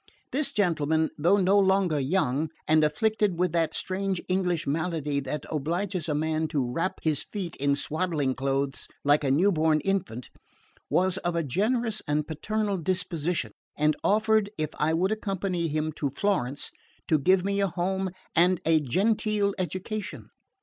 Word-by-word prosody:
This 280 +1 0
gentleman, 160 -5 +1
though 175 +7 +3
no 195 +1 +4
longer 190 -5 +2
young, 145 0 0 0.2
and 155 0 +4
afflicted 205 +4 +1
with 180 -1 +1
that 165 -1 +1
strange 190 -1 -1
English 180 -3 0
malady 150 -1 -1
that 140 +2 -4
obliges 170 +3 -2
a 150 - +1
man 155 +1 0
to 140 -6 -1
wrap 165 +8 -1
his 155 -3 +2
feet 190 -5 -5
in 140 0 +2
swaddling 155 -3 0
clothes 135 +1 -2 0.2
like 145 +1 +3
a 135 - +1
new 170 +10 +4
born 155 -2 +2
infant, 170 - -2 0.6
was 185 +1 +2
of 175 -2 -2
a 170 - +1
generous 215 - 0
and 150 +1 0
paternal 205 +6 -2
disposition, 170 - -1 0.3
and 150 0 +2
offered, 220 0 +3
if 155 -1 -2
I 155 +1 +2
would 185 +4 +1
accompany 195 -5 -1
him 155 0 -1
to 140 - -1
Florence, 140 -4 -1 0.4
to 155 - +3
give 185 +6 +3
me 200 0 0
a 200 - +2
home 190 +2 -1 0.3
and 180 +1 +4
a 160 0 +4
genteel 200 - +1
education. 185 +3 -4
170 Hz, 155 wpm, -27 LUFS, 150-195 Hz, 0.6 s, no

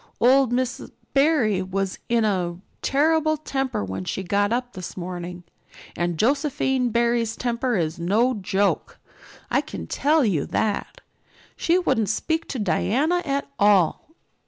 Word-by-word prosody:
Old 260 +1 +4
Miss 250 0 -1 0.3
Barry 275 - +3
was 190 +1 -3
in 235 -2 +3
a 180 -4 -1 0.2
terrible 310 +2 +2
temper 270 - -2
when 95 0 -5
she 190 - -3
got 205 +3 +1
up 245 +1 -2
this 185 -1 -8
morning 175 0 -6 0.5
and 175 -1 -1
Josephine 265 - +1
Barry's 235 -1 +1
temper 245 +1 -1
is 160 -1 -2
no 215 +9 +2
joke, 195 -4 -1 0.5
I - - +3
can 80 - -7
tell 295 - +2
you 175 -9 0
that. 215 -2 -2 0.5
She 340 +2 +2
wouldn't 265 - +1
speak 320 +9 -1
to 270 - -4
Diana 260 - +1
at 280 -1 -1
all." 205 - +3
230 Hz, 135 wpm, -24 LUFS, 190-270 Hz, 0.5 s, Old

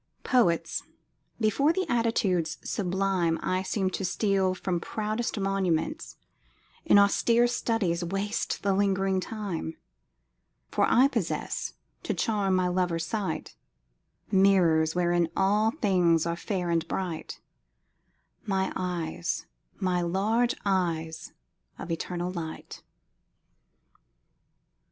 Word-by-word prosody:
Poets, 215 -10 +2 0.6
before 235 +8 +3
the 375 +2 -1
attitudes 195 - +1
sublime 185 -3 0
I 185 0 0
seem 190 0 -1
to 195 - -3
steal 190 -1 +1
from 185 -2 -2
proudest 215 +4 -3
monuments, 195 - -1 0.7
In - - +5
austere 230 +4 +4
studies 225 -8 0
waste 195 +5 -2
the 200 -1 +2
ling'ring 195 -1 +1
time; 190 -6 -5 0.9
For - - +3
I 255 +3 +6
possess, 230 - -2 0.3
to - - -2
charm 200 -4 +1
my 185 -1 +2
lover's 175 -2 0
sight, 190 -3 -3 0.8
Mirrors 175 -5 +4
wherein 175 -1 +2
all 205 +3 +3
things 180 - +2
are 170 0 -1
fair 180 -1 -2
and 165 -1 0
bright 175 -3 -4 1.0
My 190 -1 -1
eyes, 170 - -3 0.3
my 180 -2 +1
large 215 +8 +1
eyes 165 -4 -1 0.5
of 170 - -6
eternal 175 +2 -3
light! 165 -3 -7
190 Hz, 105 wpm, -28 LUFS, 170-210 Hz, 1.0 s, I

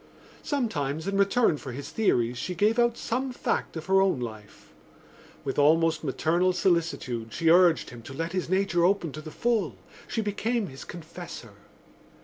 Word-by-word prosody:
Sometimes 160 - -2
in 195 - -1
return 200 -2 +3
for 130 -3 -7
his 140 +3 -7
theories 125 - +1
she 180 +9 -4
gave 215 +6 +2
out 235 -1 +3
some 255 +3 -2
fact 245 - -2
of 160 - -6
her 190 0 +4
own 190 -8 +2
life. 110 -4 -9 0.7
With 135 +1 -2
almost 160 +2 +3
maternal 170 +6 +1
solicitude 165 -11 0
she 165 -1 +2
urged 175 -2 +4
him 120 -1 -10
to 125 - -10
let 165 +3 -3
his 185 -2 -2
nature 185 -2 +2
open 180 -3 +2
to 155 - -7
the 155 - -8
full: 195 - 0 0.3
she 225 - -1
became 215 +1 -1
his 135 - -10
confessor. 170 -3 -9
170 Hz, 165 wpm, -27 LUFS, 145-200 Hz, 0.7 s, her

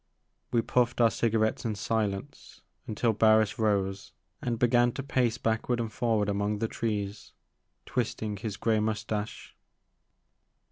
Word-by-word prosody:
We 115 -1 +2
puffed 120 +1 +1
our 115 -1 +5
cigarettes 110 -1 +1
in 110 -3 -1
silence 100 -1 -3 0.3
until 110 +1 +1
Barris 110 0 +4
rose, 100 -3 0 0.3
and 120 -2 -1
began 120 +1 +4
to 140 - -4
pace 125 -4 +1
backward 115 +1 0
and 115 -2 -3
forward 110 -4 +1
among 100 +1 0
the 115 +2 -1
trees, 105 -2 -3 0.5
twisting 110 -4 -2
his 105 -1 -5
grey 110 -2 +2
moustache. 105 0 -3
110 Hz, 130 wpm, -29 LUFS, 105-115 Hz, 0.5 s, our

